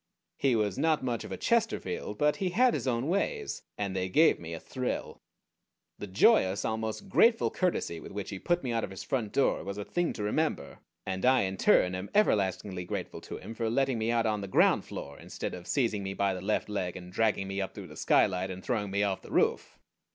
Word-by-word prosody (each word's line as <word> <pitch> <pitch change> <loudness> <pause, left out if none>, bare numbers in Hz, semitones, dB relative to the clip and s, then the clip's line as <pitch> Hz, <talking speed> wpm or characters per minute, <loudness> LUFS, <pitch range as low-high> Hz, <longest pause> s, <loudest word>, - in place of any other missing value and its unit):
He 135 -3 +3
was 105 -4 0
not 160 -3 +2
much 120 -3 -2
of - - -9
a - - -3
Chesterfield; 210 - -1
but 150 +4 +2
he 190 -3 -1
had 245 +7 +4
his - - -2
own 120 +1 0
ways, 420 - -1 0.2
and 100 -2 -2
they 95 0 -1
gave 155 - +4
me 85 0 -8
a - - -7
thrill. 130 +6 -4 0.8
The 105 - -5
joyous, 95 0 +4
almost 110 - -3
grateful 230 +4 +4
courtesy 175 - -1
with - - -10
which 100 0 -5
he 95 - -5
put 175 - 0
me 125 - -2
out 115 -1 0
of - - -3
his 95 -1 -7
front 110 0 -2
door 140 - +1
was 100 +1 -5
a 105 - -4
thing 175 -1 0
to 105 - -5
remember, 105 - -1 0.3
and 95 0 -3
I 130 +1 +5
in 95 0 -1
turn 90 -1 +4
am 95 +2 -5
everlastingly 95 - +1
grateful 90 - -5
to - - -7
him 115 - -8
for 115 -1 -2
letting 135 0 +1
me 110 +1 0
out 115 -1 +2
on 105 -2 0
the 100 - -5
ground 95 - +3
floor 70 0 -8
instead - - -5
of 90 0 -8
seizing 115 -7 +1
me 95 0 -4
by 100 -1 +1
the 90 - -5
left 105 +3 0
leg 95 -4 -3
and 90 0 -11
dragging 105 -2 +1
me 95 +1 -2
up 95 - -5
through - - -7
the - - -12
skylight, 95 +1 +2
and 95 0 -7
throwing 105 -5 -1
me 100 +1 0
off 100 -2 -1
the - - -13
roof. - - +1
105 Hz, 230 wpm, -29 LUFS, 95-130 Hz, 0.8 s, I